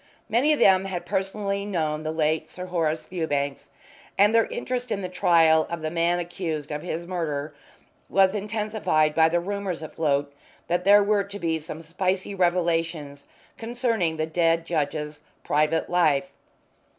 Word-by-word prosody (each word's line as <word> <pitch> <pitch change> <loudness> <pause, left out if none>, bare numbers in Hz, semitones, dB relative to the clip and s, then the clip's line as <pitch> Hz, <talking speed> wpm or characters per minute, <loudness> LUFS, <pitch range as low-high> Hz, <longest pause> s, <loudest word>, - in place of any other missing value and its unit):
Many 250 +8 +3
of 300 - +3
them 190 -4 +5
had 185 -3 -4
personally 200 +1 -2
known 160 -6 -2
the 155 0 -3
late 155 0 0
Sir 180 - -7
Horace 165 -3 -1
Fewbanks, 145 -6 -3 0.5
and 205 +2 +5
their 230 -1 +4
interest 245 0 -4
in 200 -2 -2
the - - -2
trial 165 -3 +4
of 170 -2 -5
the 155 - -2
man 170 +1 +1
accused 170 -4 -4
of 150 0 -3
his 170 -1 -4
murder 155 -5 -3 0.6
was 190 0 +4
intensified 210 -7 0
by 160 +1 +4
the 175 +1 +1
rumours 195 -2 -4
afloat 145 -2 -1 0.3
that 175 +1 -1
there 205 +1 +7
were 205 0 +2
to 200 0 -8
be 165 -4 -1
some 160 +1 -8
spicy 185 +4 -2
revelations 165 -5 -1 0.3
concerning 225 -8 -1
the 155 - 0
dead 165 0 +1
judge's 150 -2 -2 0.2
private 155 +2 +1
life. 155 -6 +2
170 Hz, 155 wpm, -25 LUFS, 155-195 Hz, 0.6 s, there